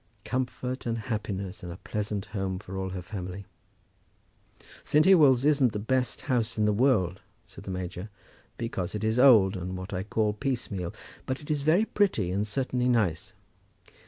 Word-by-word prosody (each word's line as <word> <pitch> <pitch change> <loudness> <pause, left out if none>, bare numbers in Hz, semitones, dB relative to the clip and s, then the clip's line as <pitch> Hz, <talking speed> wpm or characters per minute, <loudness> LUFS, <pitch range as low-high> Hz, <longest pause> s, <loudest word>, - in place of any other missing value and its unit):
Comfort, 125 0 -3
and 115 0 0
happiness, 105 -3 -4
and 90 - -6
a 85 - -8
pleasant 105 0 -3
home 95 -2 -2
for 95 0 -8
all 95 0 -2
her 90 -1 -5
family. 95 0 -6 1.4
"St. 150 +1 +3
Ewolds 145 -9 +6
isn't 140 -6 +4
the - - -2
best 125 +4 0
house 120 -4 -1
in 105 - +2
the 105 - +3
world," 100 -7 +2 0.2
said - - -13
the - - -6
major, 90 +1 -5 0.5
"because 100 -5 -3
it 105 - -3
is 110 +2 +1
old, 110 -7 +7
and 90 0 -4
what 95 +2 -7
I 90 - -1
call 105 +1 0
piecemeal; 105 -7 -3 0.4
but 130 +1 -2
it 150 - -6
is 150 -2 0
very 165 +9 +3
pretty, 185 - +1
and 100 +3 -1
certainly 125 +2 0
nice." 100 -10 0
105 Hz, 170 wpm, -28 LUFS, 95-125 Hz, 1.4 s, old